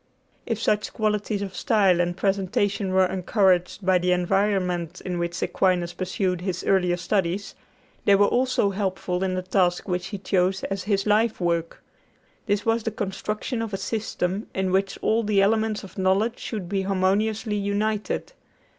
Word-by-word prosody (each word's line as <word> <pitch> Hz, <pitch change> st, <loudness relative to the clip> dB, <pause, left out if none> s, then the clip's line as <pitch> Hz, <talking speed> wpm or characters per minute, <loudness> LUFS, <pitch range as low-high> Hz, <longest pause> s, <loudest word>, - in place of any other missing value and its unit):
If 230 Hz, -3 st, -1 dB
such 210 Hz, -1 st, 0 dB
qualities 210 Hz, -1 st, -1 dB
of 190 Hz, -2 st, -6 dB
style 190 Hz, -3 st, +3 dB
and 175 Hz, 0 st, -1 dB
presentation 200 Hz, 0 st, 0 dB
were 190 Hz, 0 st, +4 dB
encouraged 185 Hz, 0 st, +1 dB
by 185 Hz, -1 st, +4 dB
the 180 Hz, +1 st, +2 dB
environment 180 Hz, -2 st, 0 dB
in 180 Hz, -2 st, -2 dB
which 170 Hz, 0 st, -2 dB
Aquinas 180 Hz, -2 st, +1 dB
pursued 185 Hz, -1 st, -2 dB
his 180 Hz, -1 st, -3 dB
earlier 180 Hz, -2 st, +2 dB
studies, 190 Hz, +1 st, -1 dB, 0.5 s
they 200 Hz, -, +6 dB
were 205 Hz, +1 st, +5 dB
also 245 Hz, -4 st, +2 dB
helpful 190 Hz, -2 st, -2 dB
in 185 Hz, -1 st, 0 dB
the 185 Hz, -, -2 dB
task 180 Hz, -1 st, +1 dB
which 180 Hz, -1 st, -2 dB
he 200 Hz, -, -5 dB
chose 190 Hz, 0 st, 0 dB
as 195 Hz, -1 st, -3 dB
his 200 Hz, -2 st, +1 dB
life 215 Hz, +2 st, +2 dB
work. 170 Hz, -2 st, -1 dB, 0.6 s
This 205 Hz, 0 st, 0 dB
was 225 Hz, 0 st, +2 dB
the 225 Hz, -, -2 dB
construction 215 Hz, +3 st, -3 dB
of 220 Hz, -3 st, -3 dB
a -, -, -3 dB
system 205 Hz, -2 st, -2 dB
in 190 Hz, -1 st, 0 dB
which 195 Hz, +1 st, 0 dB
all 225 Hz, +1 st, +2 dB
the 210 Hz, -2 st, +1 dB
elements 215 Hz, +2 st, +2 dB
of 190 Hz, -1 st, -10 dB
knowledge 195 Hz, +5 st, +1 dB
should 205 Hz, -6 st, -5 dB
be 195 Hz, +2 st, -1 dB
harmoniously 205 Hz, +3 st, 0 dB
united. 205 Hz, +1 st, -1 dB
195 Hz, 165 wpm, -24 LUFS, 180-210 Hz, 0.6 s, they